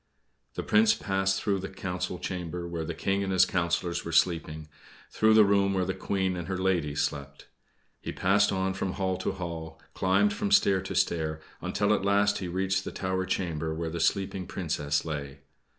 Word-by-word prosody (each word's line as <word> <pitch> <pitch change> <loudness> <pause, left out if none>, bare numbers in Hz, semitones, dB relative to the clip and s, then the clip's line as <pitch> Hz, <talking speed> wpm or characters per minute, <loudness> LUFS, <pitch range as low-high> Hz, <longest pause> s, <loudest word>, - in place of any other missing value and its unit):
The - - -3
Prince 225 0 +4
passed 95 -1 0
through 100 -2 0
the 95 - -5
council 90 -1 -4
chamber, 90 -1 -4
where 85 -1 -4
the 85 - -4
King 100 +4 0
and 95 - -2
his 95 0 +5
councillors 85 0 -1
were 85 - -5
sleeping; 80 -2 +1 0.4
through 110 0 +4
the 110 -1 +8
room 100 -1 +2
where 95 -1 +1
the 95 - -1
Queen 95 -1 -1
and 85 -1 -5
her 95 -1 -2
ladies 90 -6 0
slept. 70 0 -5 0.5
He - - -5
passed 100 +2 +3
on 95 0 0
from 95 -1 -3
hall 95 -2 -1
to - - -2
hall, 80 -2 -6
climbed 100 - +2
from 205 0 -2
stair 100 - +4
to 95 - -6
stair, 80 -2 0 0.2
until 105 +1 +1
at 105 - 0
last 100 +1 +2
he 95 - -4
reached 95 +2 0
the - - -5
tower 95 0 -2
chamber 80 -4 -2
where 80 0 -3
the 85 - -4
sleeping 95 +1 0
Princess 75 -6 -1
lay. 70 -3 -5
95 Hz, 190 wpm, -28 LUFS, 85-95 Hz, 0.5 s, the